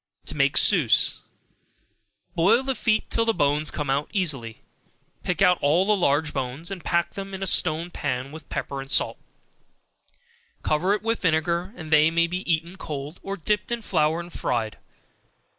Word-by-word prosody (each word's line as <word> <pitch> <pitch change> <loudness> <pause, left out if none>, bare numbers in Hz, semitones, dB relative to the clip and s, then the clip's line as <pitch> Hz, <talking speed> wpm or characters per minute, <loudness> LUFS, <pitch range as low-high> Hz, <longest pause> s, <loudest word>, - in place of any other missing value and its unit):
To - - -9
make - - +2
Souse. - - +4 1.1
Boil 180 +9 +3
the 270 0 -1
feet 220 -2 0
till 230 - +2
the 225 -1 +1
bones 150 -1 +2
come 150 - -4
out 140 +2 -1
easily, 140 - -2 0.6
and - - -38
pick 180 +1 0
out 180 -2 +4
all 160 +6 +3
the 210 +1 +3
large 155 -4 +1
bones, 135 +6 -4
pack 170 0 0
them 195 0 -6
in 190 - -5
a - - -1
stone 170 -1 +1
pan 130 -3 -3
with 155 +1 -11
pepper 140 -1 -4
and 135 - -10
salt, - - +1 1.4
and - - -38
cover 180 +7 +2
it 210 - -7
with 230 0 -1
vinegar, 170 +2 0
they 155 -3 +3
may 170 +1 +2
be 180 +1 -3
eaten 165 +3 -1
cold, 150 0 -6
or 195 0 -5
dipped 210 +6 -1
in 235 -1 -2
flour 160 -3 +1
and 175 0 -9
fried. 115 -3 -2
170 Hz, 175 wpm, -24 LUFS, 150-190 Hz, 1.4 s, Souse